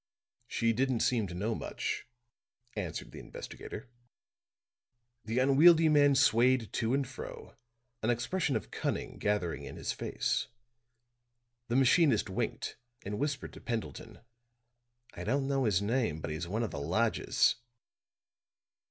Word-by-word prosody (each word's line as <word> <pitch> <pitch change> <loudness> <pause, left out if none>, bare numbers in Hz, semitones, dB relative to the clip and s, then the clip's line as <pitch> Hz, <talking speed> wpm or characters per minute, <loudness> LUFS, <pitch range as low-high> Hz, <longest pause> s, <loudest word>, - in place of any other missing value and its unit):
"She 115 -1 +1
didn't 130 0 +1
seem 115 -5 +2
to 90 - -7
know 105 +6 -1
much," - - -4 0.7
answered 90 -7 -4
the - - -9
investigator. 115 - -8 1.4
The 115 +3 -2
unwieldy 155 +5 +6
man 145 -2 +5
swayed 125 -2 +3
to 115 +3 +1
and 140 -2 0
fro, 130 - -9 0.5
an 110 - 0
expression 130 +5 0
of 110 - -3
cunning - - -3
gathering 105 -5 -1
in - - -8
his - - -3
face. - - -1 1.2
The 120 - -1
machinist 135 - +4
winked 120 +6 -3 0.3
and 105 +1 -3
whispered 145 -2 -2
to - - -11
Pendleton: 115 -1 -5 0.9
"I - - -7
don't 135 +4 0
know 135 -2 +1
his 100 -3 +2
name, 110 -7 0
but 80 - -4
he's 80 +3 -4
one 110 +6 -1
of 110 - -3
the 70 - -5
lodgers." 70 - +2
120 Hz, 135 wpm, -31 LUFS, 105-135 Hz, 1.4 s, unwieldy